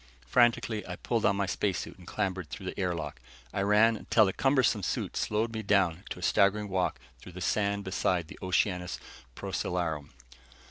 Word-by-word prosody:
Frantically, 120 -3 +3
I 90 - -4
pulled 115 +4 -1
on 100 - +4
my 100 0 0
space 95 0 0
suit - - -7
and 90 - -14
clambered 95 -5 -2
through 105 -3 -7
the 95 - -5
air 90 -2 0
lock. 80 - -5 0.3
I 100 - 0
ran, 105 +3 +5
until 110 0 +3
the 95 - 0
cumbersome 130 -6 +3
suit - - -2
slowed 110 +2 0
me 110 - -3
down 95 -3 +2
to - - -5
a 90 - -8
staggering 100 +3 +3
walk 95 -1 0 0.2
through 90 - -12
the 90 - -7
sand 100 +2 0
beside 90 -3 0
the - - -11
Oceanus 90 -1 0 0.4
Procellarum. 80 -5 -2
100 Hz, 185 wpm, -30 LUFS, 90-105 Hz, 0.4 s, ran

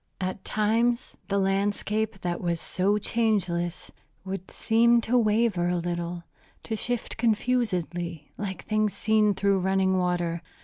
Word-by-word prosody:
At 185 +1 -3
times 230 +3 +1
the 200 - 0
landscape, 200 +1 0
that 175 -1 -2
was 170 -1 -1
so 195 +5 +1
changeless, 190 -6 -1 0.3
would 190 -1 -5
seem 235 +1 +3
to 235 +2 0
waver 215 -5 +2
a 180 - +1
little, 175 0 -3 0.4
to 225 - -3
shift 245 +2 -3
confusedly 185 - -1
like 195 -2 -5
things 215 -1 +1
seen 215 -2 +3
through 200 0 +2
running 190 0 +2
water. 175 -2 0
195 Hz, 130 wpm, -27 LUFS, 175-220 Hz, 0.4 s, seem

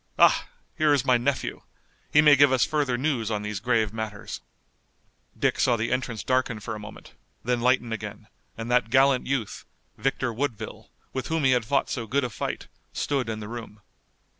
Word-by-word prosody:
Ah, - - +5 0.3
here 155 -1 +3
is 135 -2 0
my 130 - +5
nephew! 130 +3 -1 0.5
He 150 - +7
may 150 -2 +8
give 140 -1 +6
us 130 -2 +4
further 145 -5 0
news 130 -5 0
on 105 -2 -2
these 105 -2 -3
grave 110 -2 +1
matters." 110 -2 -5 1.0
Dick - - +1
saw 120 - +4
the 115 0 -2
entrance 125 -4 -2
darken 130 -3 0
for 110 +2 -5
a 105 - -6
moment, 105 0 -11 0.3
then 120 0 0
lighten 125 -2 +2
again, 105 -1 -6 0.3
and 115 +1 -4
that 125 -2 +3
gallant 135 +1 +4
youth, 130 -5 -2 0.4
Victor 130 -2 0
Woodville, 115 -3 -4 0.2
with 130 -2 -3
whom 160 -1 0
he 135 - +5
had 125 -3 +2
fought 140 +3 +1
so 115 -3 -4
good 135 +5 +1
a 125 - -2
fight, - - -4 0.3
stood 135 -5 -1
in 110 -1 -4
the 105 - -6
room. 115 -2 -8
125 Hz, 190 wpm, -26 LUFS, 110-135 Hz, 1.0 s, may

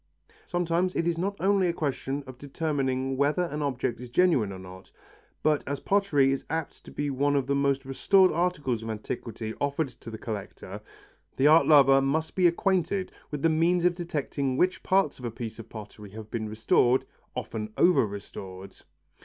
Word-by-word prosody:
Sometimes 175 +1 0
it 165 - 0
is 170 - +1
not 200 +3 -1
only 195 0 +3
a 170 - 0
question 140 -2 -3
of 130 -1 -11
determining 135 -3 -2
whether 145 +6 +2
an 150 -3 -4
object 130 -4 -2
is 125 - -8
genuine 130 - +3
or 95 - -7
not, 95 0 -12 0.5
but 150 -1 +2
as 140 -1 -2
pottery 170 -10 +2
is 135 - -2
apt 160 -1 -4
to - - -10
be 145 -1 -2
one 145 +2 +1
of 140 -2 +1
the 140 - 0
most 140 -1 +1
restored 185 +8 +4
articles 155 -9 -1
of 115 - -6
antiquity 110 0 -5
offered 140 +1 0
to 115 -2 -12
the 110 - -7
collector, 105 -3 -7 0.6
the 135 - +2
art 155 +2 +6
lover 135 -3 +7
must 155 +4 -1
be 185 -2 +4
acquainted 185 +1 0 0.2
with 150 -2 -5
the - - +6
means 170 +2 +2
of 180 - +4
detecting 145 -6 -2
which 185 +4 +1
parts 190 -8 +1
of 125 - -7
a - - -1
piece 115 -1 -7
of 115 0 -10
pottery 105 -1 -10
have 110 +1 -10
been 110 -2 -3
restored, 115 +3 +2 0.3
often 110 -1 -5
over 180 -6 +5
restored. 95 -1 -9
140 Hz, 185 wpm, -27 LUFS, 120-165 Hz, 0.6 s, lover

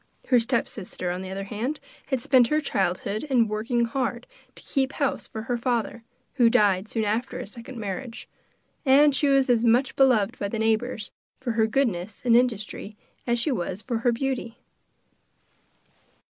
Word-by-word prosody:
Her 250 -2 +6
stepsister, 225 -6 -2
on 180 +1 -4
the 190 - -7
other 195 +1 -4
hand, 230 +9 -3 0.3
had 265 -2 0
spent 245 0 +4
her 305 +3 +2
childhood 200 - -1
in 250 -6 +3
working 230 +3 0
hard 240 0 -2 0.3
to - - -11
keep 270 0 0
house 280 -3 -1
for 220 - -6
her 240 +1 -1
father, 235 -2 -1 0.3
who 240 -3 +6
died 205 -4 +3
soon 220 -1 -1
after 225 +5 -1
his 200 - -7
second 250 +1 -10
marriage; 225 +3 -6 0.6
and 285 +1 +5
she 285 +3 +2
was 275 -1 +4
as 240 -2 +3
much 245 +3 +3
beloved 250 -4 +3
by 200 - -1
the 225 - -4
neighbours 220 +1 0 0.3
for 255 -2 -2
her 225 -1 +2
goodness 220 -6 -1
and 235 -1 +5
industry 220 -3 0 0.3
as 240 0 +2
she 260 +6 +1
was 190 -2 -3
for 235 -3 -2
her 240 +1 +2
beauty. 240 -1 -3
235 Hz, 170 wpm, -25 LUFS, 215-255 Hz, 0.6 s, Her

